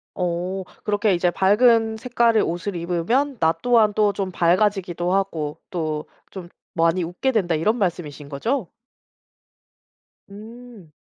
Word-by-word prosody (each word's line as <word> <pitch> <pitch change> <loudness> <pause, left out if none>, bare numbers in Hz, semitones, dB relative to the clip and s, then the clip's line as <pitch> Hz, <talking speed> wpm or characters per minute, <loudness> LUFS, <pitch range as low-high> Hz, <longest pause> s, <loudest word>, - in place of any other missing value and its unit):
어. 180 +2 -2 0.2
그렇게 205 -1 +1
이제 175 0 +2
"밝은 220 +4 +3
색깔의 235 -2 +2
옷을 175 +4 -3
입으면 180 +11 -1
나 160 0 +3
또한 230 -4 +3
또 210 -1 +3
좀 195 -1 -3
밝아지기도 180 0 +1
하고 165 -6 -1
또 155 -3 -3 0.3
좀 180 -3 -9 0.2
많이 165 +1 +2
웃게 175 +11 -1
된다." 180 -8 +1
이런 210 +10 +1
말씀이신거죠? 175 - -3 1.6
음. 220 -3 -13
190 Hz, 245 characters per minute, -22 LUFS, 170-220 Hz, 1.6 s, 밝은